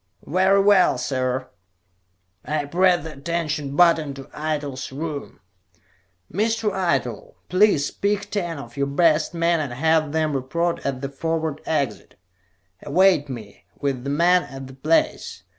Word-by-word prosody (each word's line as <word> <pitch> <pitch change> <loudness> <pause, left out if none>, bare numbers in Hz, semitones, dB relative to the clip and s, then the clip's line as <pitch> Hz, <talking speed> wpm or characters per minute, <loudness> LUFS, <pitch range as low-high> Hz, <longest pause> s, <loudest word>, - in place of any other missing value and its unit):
"Very 190 +4 +3
well, 200 -2 +5
sir." 130 -1 -2 1.0
I 150 -1 -2
pressed 175 +2 +3
the 160 -1 -7
attention 150 -1 -3
button 160 -4 +4
to 135 - -8
Eitel's 150 -4 -3
room. 145 -4 -6 0.9
"Mr. 220 +2 0
Eitel, 135 - -2
please 185 -6 +3
pick 205 0 -2
ten 175 -6 -2
of 120 -4 -10
your 140 -1 0
best 155 +2 +2
men 170 0 +2
and 145 -5 -3
have 155 +2 +2
them 155 -1 0
report 170 +6 -1
at 135 -2 -3
the 140 - -3
forward 160 +1 -2
exit. 140 -9 -2 0.7
Await 165 -1 +3
me, 110 -8 -9
with 135 -3 -2
the 140 - -3
men, 175 +5 +4
at 135 0 -9
that 130 0 -14
place. 155 - 0
155 Hz, 140 wpm, -23 LUFS, 140-175 Hz, 1.0 s, well